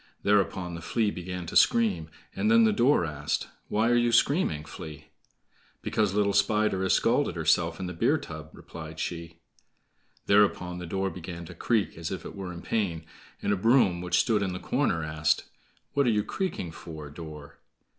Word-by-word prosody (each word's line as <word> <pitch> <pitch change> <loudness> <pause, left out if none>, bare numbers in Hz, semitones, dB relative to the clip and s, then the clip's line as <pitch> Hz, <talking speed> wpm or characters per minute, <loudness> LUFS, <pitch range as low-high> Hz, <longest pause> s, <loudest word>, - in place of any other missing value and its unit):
Thereupon 95 -3 +1
the 85 - -6
Flea 110 +1 0
began 90 -1 -6
to - - -7
scream. 95 -9 +3 0.3
And 215 - +1
then 230 0 +6
the 220 -1 +4
door 130 - +3
asked: 75 -2 -3 0.2
"Why 110 +2 +1
are - - +4
you 120 0 +3
screaming, 115 - +2
Flea?" 75 0 -10 0.7
"Because 105 -3 0
little 100 -1 +2
Spider 100 -1 +2
has 95 - +2
scalded - - +2
herself - - +1
in 95 - -3
the 90 - -4
beer 140 - +2
tub," 80 - -8
replied 80 -1 -10
she. 85 0 -5 0.9
Thereupon 95 -3 +3
the 90 - -6
door 95 +2 -1
began 85 -1 -7
to 90 - -10
creak 105 0 0
as 85 - -4
if 95 - -5
it - - -8
were 95 -2 -5
in 85 0 -9
pain; 90 -8 -1 0.4
and 100 - +2
a - - +2
broom, 100 -4 +3
which 90 0 +1
stood 110 -4 +1
in 95 -2 -1
the 90 - -5
corner, 80 -2 0
asked, 75 0 +1 0.5
"What 140 -2 +2
are - - +5
you 105 -2 +2
creaking 145 - -3
for, 80 -3 -9
door?" 75 -2 -10
90 Hz, 185 wpm, -28 LUFS, 80-105 Hz, 0.9 s, then